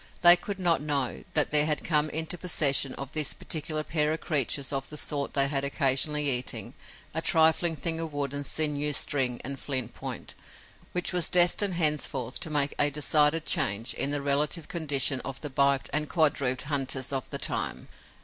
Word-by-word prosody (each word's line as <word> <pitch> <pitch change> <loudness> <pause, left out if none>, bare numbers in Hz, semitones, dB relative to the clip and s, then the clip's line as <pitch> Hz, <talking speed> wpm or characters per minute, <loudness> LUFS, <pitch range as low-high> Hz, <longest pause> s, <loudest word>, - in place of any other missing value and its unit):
They 175 0 +12
could 195 +3 -8
not 175 -4 +1
know 145 -4 -1
that 150 - +2
there 150 0 +5
had 150 -2 -1
come 155 -2 +1
into 160 +3 -2
possession 145 -6 +1
of 135 -1 -8
this 155 -3 -1
particular 155 -1 -3
pair 150 -1 -1
of 160 - -5
creatures 140 -2 -1
of 135 -1 -4
the 150 - -5
sort 145 -1 -2
they 140 -1 +4
had 140 -1 -1
occasionally 140 +1 +1
eaten, 125 -2 -1 0.4
a - - 0
trifling 160 +1 +2
thing 165 +1 -1
of 165 -1 -5
wood 145 -1 -5
and 145 0 -2
sinew 150 0 -1
string 130 -3 0
and 140 +1 -4
flint 130 -5 -4
point, - - -6 0.6
which 180 +1 -1
was 175 -3 +1
destined 180 +2 +4
henceforth 150 -6 -1
to - - -3
make 145 -2 +1
a 145 - +3
decided 150 +2 +1
change 100 +4 +1
in 140 - -2
the 145 -1 -3
relative 145 +3 -1
condition 145 -5 0
of 135 -1 -7
the 150 - -7
biped 140 0 +1
and 150 +1 -1
quadruped 140 -6 +1
hunters 135 -2 -2
of 135 -2 -5
the - - -2
time. - - -3
145 Hz, 185 wpm, -26 LUFS, 140-160 Hz, 0.6 s, They